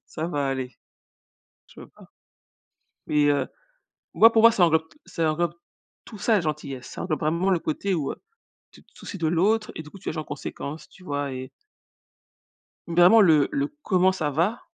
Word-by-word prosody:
Ça 160 +1 -5
va 145 -5 -1
aller. 130 -1 -4 0.9
Je - - -20
peux - - -12
pas. - - -19 1.0
Et 150 -1 +2
heu, 145 -1 +1 0.7
moi, 225 +1 +7
pour 225 -1 +3
moi, 230 - +9
ça 195 - +1
englobe 160 0 +1
t - - -23
ça 160 -3 -1
englobe 170 +1 -1 0.5
tout 215 - -11
ça, 225 +2 +2
la 195 - +2
gentillesse. 145 -4 -5
Ça - - -7
englobe 160 -4 -2
vraiment 170 +5 0
le 185 - +3
côté 185 +5 -2
où, 150 -5 -2
heu, - - -10 0.6
tu - - -18
te - - -32
soucies 200 - -9
de 165 -2 -1
l'autre, 210 +7 +1
et 160 - -6
du 150 - -13
coup, 195 - -13
tu - - -5
agis 155 - -5
en 155 - -4
conséquence, 150 +2 -7
tu - - -19
vois? 145 -4 -3
Et 130 0 -6 1.4
vraiment 175 +6 +6
le 155 -7 +4
le: 285 0 0 0.2
«Comment 185 -1 +3
ça 155 -5 -2
va»? 175 - 0
165 Hz, 195 wpm, -25 LUFS, 150-190 Hz, 1.4 s, moi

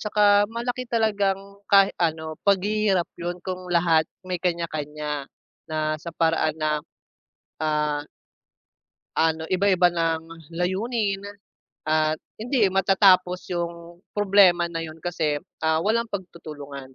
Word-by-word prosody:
Tsaka 205 -1 +4
malaki 240 +2 -4
talagang 205 -4 +2 0.3
kahit 195 -1 +6
ano 160 -1 -1
paghihirap 200 -1 +2
yun 175 +1 -3
kung 185 -1 -5
lahat 170 -2 +4 0.2
may 180 -2 -3
kanya-kanya 150 -4 -3 0.4
na 155 0 0
sa 170 - -8
paraan 160 -1 +1
na, 155 -1 0 0.8
ah 150 -1 0 1.1
ano 160 0 +1
iba-iba 185 0 +3
ng 165 -1 -3
layunin 195 +4 -1 0.6
at 155 0 +2 0.2
hindi 245 +2 0
matatapos 185 -1 +3
yung 170 -1 -5 0.2
problema 190 -4 +4
na 165 - -4
yun 160 0 -8
kasi, 160 -4 -1 0.2
ah, 160 0 +2
walang 230 +4 +1
pagtutulungan 145 - -8
175 Hz, 110 wpm, -24 LUFS, 160-200 Hz, 1.1 s, kahit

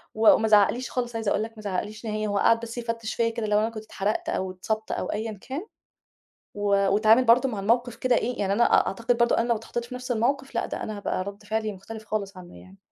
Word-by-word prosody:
وما 220 0 +5
زعقليش 215 +4 +3
خالص، 240 -2 -3
عايزة 225 -3 -1
أقول 210 - +1
لك 225 +1 -5
ما 215 - -10
زعقليش 210 +3 -4
نهائي، 215 0 -2
هو 205 -1 0
قعد 230 +2 +4
بس 235 +1 -7
يفتش 230 -1 -3
فيّا 230 -1 +1
كده 225 -1 -3
لو 210 0 +3
أنا 225 +1 0
كنت 215 -1 -8
اتحرقت 210 0 -2
أو 185 0 -1
اتصابت 215 +4 -4
أو - - -2
أيًا 220 +1 -3
كان، 295 +10 -6 0.9
و 205 - -6 0.3
واتعامل 220 +5 +5
برضه 245 +3 +5
مع 210 -5 -4
الموقِف 235 +3 +1
كده 250 0 +2
إيه، 245 +1 -1
يعني 195 -1 0
أنا 235 +4 +4
أ - - +4
أعتقد 230 +4 0
برضه 235 0 +3
أنا 235 +1 +1
لو 235 - +3
اتحطيت 235 +2 -5
في 250 - -9
نفس 250 0 -7
الموقِف 265 +4 0
لأ - - 0
ده - - -5
أنا 215 -1 -5
هابقى 185 -2 -2
رد 200 +1 -8
فعلي 220 0 -2
مختلف 220 +3 -10
خالص 200 -2 -3
عنه 175 -1 -12
يعني. 190 +1 -16
220 Hz, 240 wpm, -26 LUFS, 210-235 Hz, 0.9 s, وما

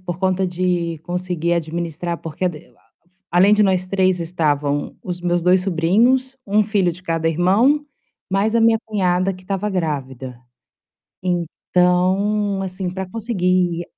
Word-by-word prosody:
por 175 -2 -5
conta 190 0 +1
de 175 -2 -1
conseguir 175 -1 -2
administrar, 170 +1 -3
porque 165 +3 -5 0.9
além 180 +4 +5
de 210 0 +4
nós 185 -2 +1
3, 185 -1 +1
estavam 150 -4 -1
os 180 -1 -4
meus 175 0 0
2 180 +2 +4
sobrinhos, 225 +10 +2
1 210 +2 +3
filho 200 -4 +1
de 175 +2 -12
cada 165 -2 -1
irmão, 200 - +3 0.5
mais 205 +4 +1
a 230 - +4
minha 225 0 +5
cunhada 190 -3 0
que 185 - -13
estava 195 +2 -2
grávida. 135 -8 -4 0.8
Então, 185 +3 +1
assim, 185 -1 -4
para 190 +1 -4
conseguir 185 -6 0
180 Hz, 135 wpm, -20 LUFS, 170-195 Hz, 0.9 s, além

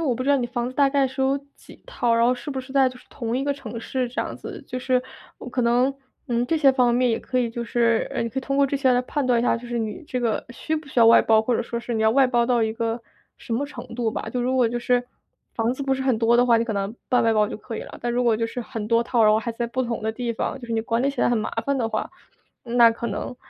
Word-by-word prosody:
我 280 -7 +1
不 255 - -3
知 270 - -2
道 285 - +5
你 245 -2 -1
房 240 0 -3
子 255 - -9
大 280 -1 +5
概 275 -1 +2
是 265 +1 -6
有 270 +1 +2 0.2
几 - - -17
套， 235 -1 0
然 230 0 +3
后 245 - +4
是 255 - -7
不 265 - -3
是 260 +1 -12
在 270 -2 +4
就 255 - -12
是 - - -19
同 235 +1 -3
一 265 - -1
个 285 +1 0
城 245 -5 -7
市， 255 +1 -2
这 250 - -2
样 - - -6
子。 - - -8
就 255 - -5
是， 255 0 +1 0.4
哦， - - -8
可 250 0 -2
能 245 +3 +3 0.4
嗯， 240 0 0
这 325 - +1
些 280 -3 +5
方 250 -2 +2
面 250 -1 +2
也 225 - 0
可 255 - -5
以 240 -2 +1
就 235 +1 -4
是 230 -1 +1
呃， - - 0
你 230 - -2
可 230 - -4
以 - - -1
通 275 +2 -2
过 280 - +5
这 275 +1 0
些 265 -2 +3
来 245 0 +2
判 280 +2 -2
断 245 -2 +3
一 - - -1
下， 240 - +2
就 240 - -9
是 240 0 -4
你 225 +9 -4
这 250 -2 -3
个 230 -3 -1
需 315 +6 -3
不 310 -1 -7
需 260 -3 0
要 230 - +7
外 230 - +8
包， 220 -1 +4
或 235 +1 +1
者 - - -1
说 235 0 -4
是 240 - -5
你 220 - -1
要 220 0 +4
外 270 0 +4
包 240 -2 +2
到 240 -2 +2
一 220 0 0
个 230 0 -3 0.4
什 - - -7
么 265 +5 0
程 250 -4 -9
度 235 -2 0
吧。 - - -4
就 250 - -2
如 250 +2 0
果 250 -3 +3
就 240 - -2
是 245 0 +1 0.5
房 230 +2 0
子 275 - -5
不 270 - 0
是 265 - -1
很 260 -3 +1
多 230 +1 +3
的 245 +1 +4
话， 235 -1 +5
你 225 - +2
可 230 - -3
能 200 +2 -3
半 250 -2 +3
外 225 - +3
包 210 -1 +3
就 - - -5
可 225 +1 -7
以 - - -4
了， - - -10
但 240 0 -2
如 250 +1 +1
果 230 -2 +3
就 230 0 -1
是 245 +2 -5
很 225 -2 -5
多 230 +1 +3
套， 235 -2 +2
然 215 - +6
后 215 - +3
还 235 - -3
在 235 +1 -3
不 255 +2 -2
同 235 -1 -3
的 220 0 -2
地 235 0 -3
方， 225 - -3
就 240 - -9
是 - - -3
你 225 - +1
管 230 +1 -1
理 275 - +2
起 275 - -5
来 - - +3
很 240 - +2
麻 215 - -2 0.2
烦 280 0 +1
的 235 -4 0
话， - - -2 0.5
嗯， 240 0 -4
那 235 -1 +8
可 235 +1 -4
能 215 +4 -5
240 Hz, 355 characters per minute, -23 LUFS, 230-260 Hz, 0.5 s, 外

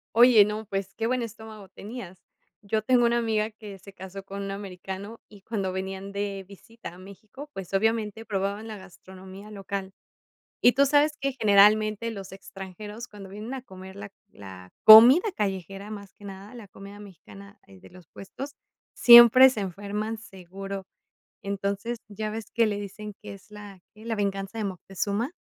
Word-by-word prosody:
Oye, 235 -3 +7
no, 210 +1 -5
pues, 195 -1 -4
qué 225 0 -2
buen 250 -1 -1
estómago 220 -3 -10
tenías. 200 -5 -10 0.4
Yo 215 +1 -2
tengo 245 0 +3
una 235 0 +1
amiga 220 -2 0
que 210 -3 -12
se 195 +2 -14
casó 190 +1 -9
con 200 +1 -7
un 195 - -5
americano 195 +2 -8
y 205 -2 -17
cuando 195 -3 -3
venían 190 +1 -5
de 200 -1 -4
visita 205 +1 -12
a 180 - -15
México, 205 +9 -12
pues, 195 -5 -9
obviamente, 220 +1 0
probaban 200 0 -3
la 215 -1 -7
gastronomía 190 +1 -13
local. 195 -1 -6 0.7
Y 245 - +6
tú 275 +3 +4
sabes 295 +2 +3
que 275 0 -1
generalmente 215 +2 +4
los 195 -4 -9
extranjeros, 195 +3 -9
cuando 205 -4 -12
vienen 215 +6 -7
a 260 - -6
comer 190 -5 -12
la 200 0 -9 0.2
la 95 -2 -12
comida 245 - +9
callejera, 195 - -4
más 200 -2 -10
que 205 - -19
nada 200 +3 -10
la 225 -4 -11
comida 200 +1 -12
mexicana 200 +1 -14
de 95 -1 -16
los 180 -2 -17
puestos, 275 +8 -9 0.4
siempre 240 +2 +9
se 255 -5 -4
enferman 205 +3 -4
seguro. 195 -1 -9 0.6
Entonces, 200 +4 -3
ya 215 +1 -5
ves 220 0 -7
que 230 -1 +3
le 205 -1 -2
dicen 205 +1 -8
que 210 -1 -9
es 195 +1 -17
la 205 -2 -12
que 215 - -17
es - - -12
la 230 - -1
"Venganza 200 +1 -3
de 215 - -2
Moctezuma". 200 - -3
205 Hz, 170 wpm, -26 LUFS, 195-220 Hz, 0.7 s, comida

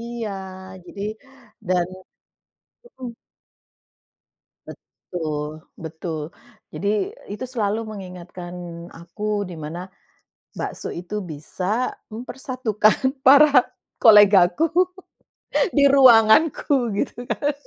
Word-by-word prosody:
iya 235 -2 -5 0.5
jadi 200 +2 -8 0.7
dan 180 -1 +2 1.0
mhm. 260 - -9 1.6
Betul, 155 -2 -6 0.2
betul, 160 -1 -5 0.5
jadi 205 -1 -1 0.2
itu 210 - -7
selalu 220 -4 -1
mengingatkan 180 -3 -9 0.4
aku, 205 +5 -4
dimana 170 +3 -7 0.7
bakso - - -5
itu 180 +5 -5
bisa 185 +7 -3 0.2
mempersatukan 250 +1 -1
para 280 -1 +7 0.3
kolegaku 210 - +6 1.1
di 285 - +4
ruanganku 260 0 +5
gitu 240 +3 -3
kan. 290 0 0
210 Hz, 75 wpm, -22 LUFS, 175-250 Hz, 1.6 s, para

